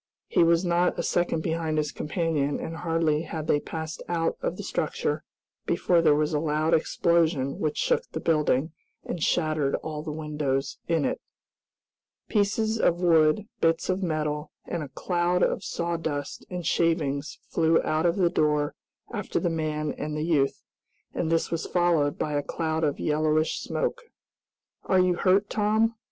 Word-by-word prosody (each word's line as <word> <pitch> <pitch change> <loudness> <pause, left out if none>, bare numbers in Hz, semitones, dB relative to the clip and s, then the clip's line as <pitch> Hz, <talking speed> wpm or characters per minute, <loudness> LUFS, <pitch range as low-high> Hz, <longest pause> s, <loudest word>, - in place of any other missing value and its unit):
He - - +3
was 170 +2 +3
not 175 +1 +2
a - - -1
second 175 -2 0
behind 160 -1 -1
his 150 -1 0
companion, 155 -3 -1
and 165 - -5
hardly 165 -3 +1
had 160 -1 -5
they 145 - +2
passed 160 +1 -6
out 165 -1 0
of - - -2
the - - -6
structure - - -2 0.4
before 175 -2 +3
there 155 -3 +5
was 150 +1 0
a 150 - +2
loud 155 +1 +1
explosion 160 -3 +2
which 155 -1 -1
shook - - +1
the - - -3
building, 150 -2 +1 0.3
and 175 - -4
shattered 155 -4 +1
all 155 -1 -4
the 155 0 -5
windows 150 -3 -2
in 165 -4 +1
it. - - -2 1.1
Pieces 220 +1 +1
of 175 -4 +2
wood, 165 +3 +4
bits 165 +2 +1
of 185 +1 0
metal, 150 -3 -2
and 170 - -3
a 145 - -6
cloud 175 +4 0
of - - +1
sawdust 165 -5 -3
and 180 -2 -5
shavings 155 -4 0
flew 165 0 +3
out 155 +2 +1
of 170 - +1
the 180 -3 +2
door 150 -3 +1 0.4
after - - -2
the 175 - 0
man 155 -2 -1
and 150 0 -3
the 150 - -1
youth, 145 -5 +1 0.5
and 165 -1 -1
this 165 -1 +1
was 165 -1 -2
followed 170 -5 +2
by 150 - -2
a 145 - +1
cloud 160 +2 -2
of 145 -2 0
yellowish 155 +1 +1
smoke. 485 -1 -2 0.8
"Are 190 - +3
you 180 0 +4
hurt, 195 +3 +3
Tom?" 220 +2 +2
160 Hz, 165 wpm, -26 LUFS, 150-175 Hz, 1.1 s, there